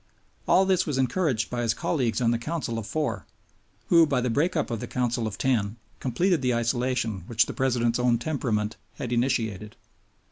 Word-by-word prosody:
All 190 - +5
this 190 -3 +2
was 145 -3 -1
encouraged 130 -3 0
by 120 0 -1
his 115 -1 +1
colleagues 130 -8 0
on 115 -1 +3
the 120 - 0
Council 125 -4 -3
of 105 - -7
Four, 125 -11 -2 0.6
who, 165 -2 +6
by 125 - +1
the 125 -1 0
break 165 +9 +1
up 155 - -1
of 115 - -2
the - - -5
Council 120 -2 -1
of 105 -2 -6
Ten, 110 -5 0 0.2
completed 170 +6 +1
the 125 -2 +1
isolation 120 -2 0
which 115 -1 +3
the - - -6
President's 120 -2 +1
own 125 -1 +3
temperament 115 -6 -2 0.2
had 125 -3 -4
initiated. 110 -4 -1
125 Hz, 185 wpm, -26 LUFS, 115-140 Hz, 0.6 s, who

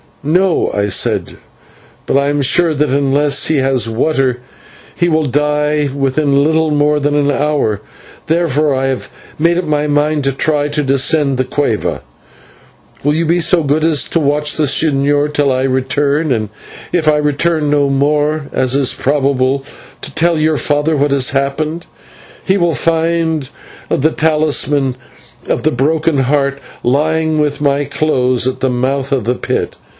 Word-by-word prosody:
"No," 175 +4 +1
I 100 0 0
said, 95 - -1 0.7
"but - - -1
I 140 +1 +2
am 145 -1 0
sure 165 +4 +2
that 150 +1 0
unless 140 +1 +1
he 160 - +1
has 130 -3 +1
water 130 +1 0 0.6
he 175 0 +1
will 155 -1 +1
die 150 +1 0
within 140 +1 +1
little 160 +1 +1
more 150 0 +1
than 145 0 0
an 145 -1 +2
hour. 145 -8 0 0.5
Therefore 155 -3 +1
I 130 0 -1
have 130 -1 -3 0.3
made 170 +2 +2
up 180 - -1
my 150 -1 0
mind 150 0 0
to 135 - +2
try 145 +2 0
to 150 0 -1
descend 140 +1 +1
the 130 - +1
/cueva/. 130 -4 -2 1.0
Will 145 +2 +1
you 165 +1 0
be 170 +2 +1
so 170 0 +2
good 150 +2 0
as 155 -5 +2
to 165 - 0
watch 150 0 +1
the 155 - +2
señor 145 0 +1
till 145 -2 +2
I 130 0 0
return, 140 +3 0
and 110 -4 -1 0.4
if 165 -3 0
I 150 -1 +4
return 150 +1 0
no 145 -1 +2
more, 150 +2 0
as 130 0 0
is 140 -2 +2
probable, 135 -1 0 0.4
to - - -3
tell 170 0 +1
your 155 0 +1
father 150 +2 0
what 145 0 +1
has 135 -3 +2
happened. 150 +4 -2 0.6
He 190 - +2
will 170 -4 +1
find 165 -1 0 0.4
the 155 +4 +1
talisman 150 -4 0 0.5
of - - -1
the 155 - +2
Broken 155 +3 0
Heart 140 +1 0 0.2
lying 155 +4 +1
with 150 -1 -1
my 145 0 +1
clothes 130 -6 0
at 130 - -3
the 130 - 0
mouth 135 +2 -1
of 135 -4 0
the 120 +3 -1
pit. - - -3
145 Hz, 165 wpm, -14 LUFS, 135-155 Hz, 1.0 s, I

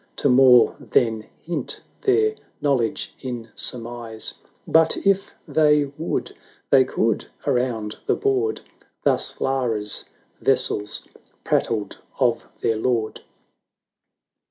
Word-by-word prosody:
To 140 - +1
more 125 -1 +6
than 110 -2 0 0.2
hint 170 +1 -4 0.2
their 430 +2 +3 0.3
knowledge 135 -6 0
in 120 -3 -6
surmise; 115 -2 -5 0.3
But 160 0 +4
if 195 0 +1
they 150 -2 +3
would 160 +3 -3 0.2
— - - -35
they 130 -2 +6
could" 115 -3 0
— - - -25
around 115 -4 -1
the - - +3
board 410 +1 0 0.4
Thus - - +2
Lara's 115 -6 0 0.4
vassals 105 0 0 0.4
prattled 105 -4 -1 0.2
of - - +2 0.2
their 115 - +1
lord. 115 -1 -1
125 Hz, 110 wpm, -23 LUFS, 115-150 Hz, 0.4 s, more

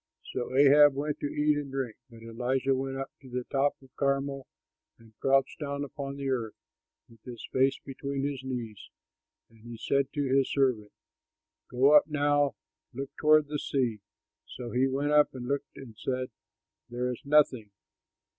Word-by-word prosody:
So 125 - -3
Ahab 145 0 +7
went 145 +1 -2
to - - -2
eat 150 +1 +1
and 145 -1 -4
drink. 130 -4 -3
But 115 -1 -14
Elijah 125 +4 0
went 135 0 -3
up 135 0 -5
to 130 - -13
the 125 0 -3
top 140 +1 +2
of 130 -1 -21
Carmel 140 -1 -1 0.5
and 115 -1 -20
crouched 135 0 +2
down 140 -1 -3
upon 140 0 -6
the 140 -1 -4
earth, 120 -5 -2 0.5
with 115 -2 -20
his 120 -1 -9
face 135 +1 +3
between 140 0 -4
his 140 -2 -2
knees. 120 -5 -6 0.6
And 115 - -21
he 115 +1 -10
said 140 +3 0
to 145 - -1
his 135 0 +2
servant, 125 -7 +1 0.8
"Go 135 +4 +5
up 150 - +7
now, 145 -1 +1 0.4
look 135 +1 -5
toward 155 -1 +5
the 150 0 -3
sea." 120 -8 -1 0.5
So 120 -2 -7
he 130 +2 +2
went 140 +2 -1
up 150 -2 +4
and 125 -1 -6
looked 140 +1 -3
and 125 -5 -11
said, 130 +2 -3 0.6
"There 125 +1 -2
is 125 - -7
nothing." 140 -7 +3
135 Hz, 170 wpm, -29 LUFS, 125-140 Hz, 0.8 s, Ahab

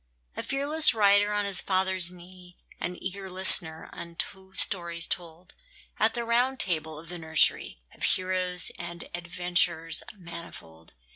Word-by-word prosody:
A - - -3
fearless 285 +1 +3
rider 205 -1 +4
on 205 0 0
his 200 -2 0
father's 185 -2 0
knee, 180 0 -15 0.2
An 180 0 -4
eager 190 +1 -5
listener 180 -3 +4
unto 190 +3 -6
stories 170 -3 -1
told 175 +1 -5 0.5
At 220 +1 +2
the 235 -1 -2
Round 245 +3 +1
Table 160 -4 -1
of 160 +2 -11
the 175 -1 -5
nursery, 160 -1 +3 0.2
Of - - -20
heroes 185 -1 +1
and 170 -1 -7
adventures 175 -1 0
manifold. 165 - -12
180 Hz, 135 wpm, -27 LUFS, 170-195 Hz, 0.5 s, rider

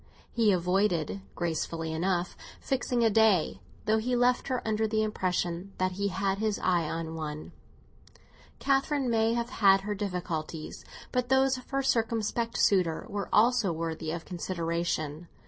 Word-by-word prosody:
He 225 -3 +3
avoided, 180 0 +1
gracefully 165 -1 -2
enough, 175 +1 -1 0.2
fixing 250 -3 0
a 225 - +4
day, 200 - +3 0.3
though 220 +1 +3
he 245 +3 0
left 245 +1 +2
her 255 -4 -2
under 220 0 +1
the 215 0 +1
impression 185 -2 -2
that 185 0 +1
he 200 +2 -1
had 195 +1 -1
his 215 -1 0
eye 175 -4 +1
on 165 -1 -4
one. 155 -1 -6 1.1
Catherine 275 -1 +1
may 225 0 +2
have 235 +1 -2
had 195 -5 +5
her 210 +1 -3
difficulties; 175 -6 -4 0.3
but 250 -1 -1
those 265 0 +4
of 255 - -16
her 275 0 0
circumspect 230 -1 0
suitor 180 -5 +2
are 200 -1 -3
also 225 -3 +4
worthy 160 -1 -3
of 165 +1 -4
consideration. 170 -3 -3
195 Hz, 145 wpm, -29 LUFS, 170-230 Hz, 1.1 s, had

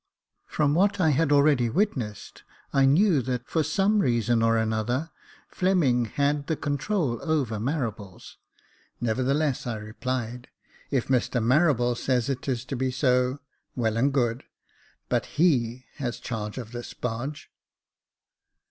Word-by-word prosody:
From 145 -1 +1
what 200 +4 +2
I 160 -4 +4
had 150 +1 +1
already 140 -4 +4
witnessed, 125 - -2 0.3
I 135 -1 +4
knew 160 +1 +4
that, 125 -1 -3
for 160 - +1
some 195 +7 +2
reason 120 - +2
or 115 0 +3
another, 110 +7 -1 0.4
Fleming 155 -11 +2
had 140 +5 -1
the 160 - 0
control 145 - -1
over 140 -10 -1
Marables 110 - -4
j - - -20 0.7
nevertheless 135 +5 0
I 120 - -2
replied, 120 +3 -4 0.2
" - - -28
If 135 -4 0
Mr 125 -1 +1
Marables 125 -1 +2
says 125 -1 0
it 135 -1 -3
is 125 -2 -2
to 135 - -4
be 130 +1 0
so, 125 0 +1 0.3
well 110 -3 0
and 135 +5 +2
good; 120 -3 0 0.6
but - - 0
he 130 -7 +2
has 125 -5 -3
charge 105 -2 -5
of 115 -3 -6
this 120 0 -7
barge." 125 +5 -5
130 Hz, 140 wpm, -26 LUFS, 120-150 Hz, 0.7 s, I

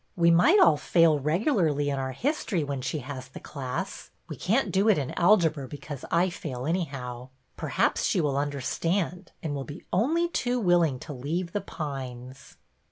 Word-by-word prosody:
"We 170 -1 +4
might 235 - +6
all 155 - +6
fail 160 0 +3
regularly 155 - +1
in 140 - -2
our 130 0 -3
history 230 - -1
when 140 -2 -3
she 135 +4 -2
has 130 -2 -6
the 130 - -10
class. 130 -3 -5 0.2
We - - -6
can't 230 +8 +1
do 200 +3 +3
it 210 - +5
in 140 -3 -2
algebra 165 -7 +3
because 145 -1 -8
I 175 +2 +2
fail, 130 -7 -5
anyhow. 135 -7 -3 0.3
Perhaps - - 0
she - - +2
will 145 -4 +1
understand 165 +6 -1
and 155 -3 -2
will 140 -1 -3
be 145 +4 -10
only 310 - +2
too 250 -7 -1
willing 175 - +3
to 150 - -7
leave 165 +7 -3
The 205 - -2
Pines." 130 -4 -7
155 Hz, 170 wpm, -27 LUFS, 135-180 Hz, 0.3 s, might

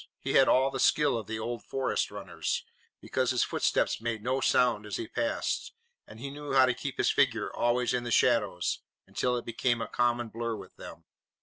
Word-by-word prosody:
He - - -3
had 135 - +6
all 135 +1 +4
the - - -4
skill 150 -4 +3
of 110 -4 -4
the 110 - -3
old 115 0 -4
forest 135 -1 -1
runners, - - -3 0.4
because 130 -1 -1
his 125 -1 +2
footsteps - - 0
made 115 -2 -3
no 130 +2 0
sound 120 -6 +2
as 105 - -4
he 115 - -4
passed 290 - -2 0.3
and - - -12
he 135 +3 -6
knew 145 0 -6
how 130 -1 +7
to 125 - +1
keep 135 +2 -6
his - - +3
figure 120 -6 +1
always 120 +1 +1
in 125 - 0
the 120 - -4
shadows 105 -8 +2 0.3
until 125 -1 -1
it 120 - -5
became 120 +1 0
a 115 - -3
common 120 0 0
blur 115 0 -3
with - - -11
them. - - -11
120 Hz, 205 wpm, -29 LUFS, 115-130 Hz, 0.4 s, how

